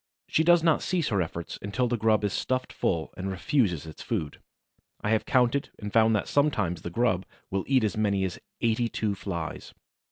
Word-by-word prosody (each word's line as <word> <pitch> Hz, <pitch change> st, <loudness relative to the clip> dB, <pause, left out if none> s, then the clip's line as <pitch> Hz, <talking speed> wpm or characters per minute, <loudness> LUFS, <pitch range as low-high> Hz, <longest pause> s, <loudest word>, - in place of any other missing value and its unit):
She 160 Hz, -, +2 dB
does 175 Hz, 0 st, +5 dB
not 165 Hz, -2 st, +3 dB
cease 175 Hz, -5 st, 0 dB
her 100 Hz, -5 st, +1 dB
efforts 85 Hz, 0 st, -5 dB
until 100 Hz, +5 st, 0 dB
the 120 Hz, -, 0 dB
grub 110 Hz, -1 st, +2 dB
is 100 Hz, -, 0 dB
stuffed 130 Hz, 0 st, -1 dB
full 80 Hz, -3 st, -1 dB
and 95 Hz, +1 st, -4 dB
refuses 95 Hz, -, 0 dB
its 80 Hz, -, -10 dB
food. 85 Hz, -11 st, -3 dB, 0.6 s
I 105 Hz, -, 0 dB
have 110 Hz, -, +1 dB
counted 130 Hz, +1 st, +2 dB
and 105 Hz, -1 st, -6 dB
found 110 Hz, -1 st, +5 dB
that 105 Hz, -, -1 dB
sometimes 105 Hz, -, +1 dB
the -, -, -5 dB
grub 95 Hz, -1 st, +1 dB, 0.3 s
will 95 Hz, 0 st, -1 dB
eat 130 Hz, -3 st, +3 dB
as 105 Hz, -, 0 dB
many 100 Hz, -3 st, +1 dB
as 95 Hz, -2 st, -3 dB, 0.2 s
eighty 115 Hz, 0 st, +1 dB
two 110 Hz, -3 st, -1 dB
Flies. 85 Hz, -5 st, -5 dB
110 Hz, 195 wpm, -27 LUFS, 95-125 Hz, 0.6 s, does